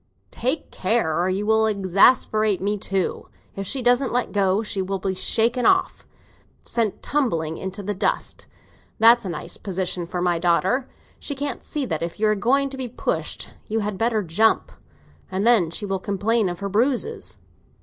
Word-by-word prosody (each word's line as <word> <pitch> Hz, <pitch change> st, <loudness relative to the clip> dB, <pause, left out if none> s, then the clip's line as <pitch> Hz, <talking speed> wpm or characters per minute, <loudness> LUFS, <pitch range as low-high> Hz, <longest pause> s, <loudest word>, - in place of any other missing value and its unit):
"Take 260 Hz, +6 st, -2 dB
care, 185 Hz, -5 st, +1 dB
or 180 Hz, -, +1 dB
you 195 Hz, +2 st, -1 dB
will 220 Hz, 0 st, +3 dB
exasperate 205 Hz, +1 st, +3 dB
me 205 Hz, +2 st, 0 dB
too. 195 Hz, -2 st, -2 dB, 0.3 s
If 195 Hz, -1 st, -5 dB
she 260 Hz, +3 st, -2 dB
doesn't 245 Hz, +2 st, +3 dB
let 245 Hz, 0 st, 0 dB
go, 200 Hz, +1 st, +2 dB
she 205 Hz, -2 st, -3 dB
will 195 Hz, +1 st, -2 dB
be 190 Hz, 0 st, -2 dB
shaken 230 Hz, +6 st, +1 dB
off—sent 225 Hz, -1 st, -2 dB
tumbling 165 Hz, -, -1 dB
into 190 Hz, +2 st, -6 dB
the 205 Hz, +2 st, -2 dB
dust! 195 Hz, -, -2 dB, 0.5 s
That's 230 Hz, 0 st, +6 dB
a -, -, -3 dB
nice 170 Hz, -, -5 dB
position 185 Hz, -3 st, -2 dB
for 180 Hz, -, -4 dB
my 175 Hz, -1 st, +1 dB
daughter. 185 Hz, +9 st, +1 dB, 0.3 s
She 285 Hz, -, -4 dB
can't 280 Hz, -2 st, -4 dB
see 295 Hz, -3 st, -3 dB
that 160 Hz, -9 st, -3 dB
if 170 Hz, +4 st, -4 dB
you 215 Hz, -, +2 dB
are 215 Hz, -, +4 dB
going 270 Hz, +6 st, +1 dB
to 270 Hz, -, -7 dB
be 260 Hz, -1 st, -3 dB
pushed 235 Hz, -, -3 dB, 0.2 s
you 220 Hz, 0 st, -1 dB
had 205 Hz, -2 st, -3 dB
better 225 Hz, -2 st, +1 dB
jump. 190 Hz, +7 st, +2 dB, 0.6 s
And 190 Hz, +2 st, -2 dB
then 225 Hz, -9 st, +4 dB
she 205 Hz, +5 st, -3 dB
will 195 Hz, -1 st, -2 dB
complain 205 Hz, +2 st, 0 dB
of 175 Hz, +2 st, -6 dB
her 200 Hz, -, -2 dB
bruises." 255 Hz, -, -1 dB
205 Hz, 175 wpm, -23 LUFS, 185-235 Hz, 0.6 s, That's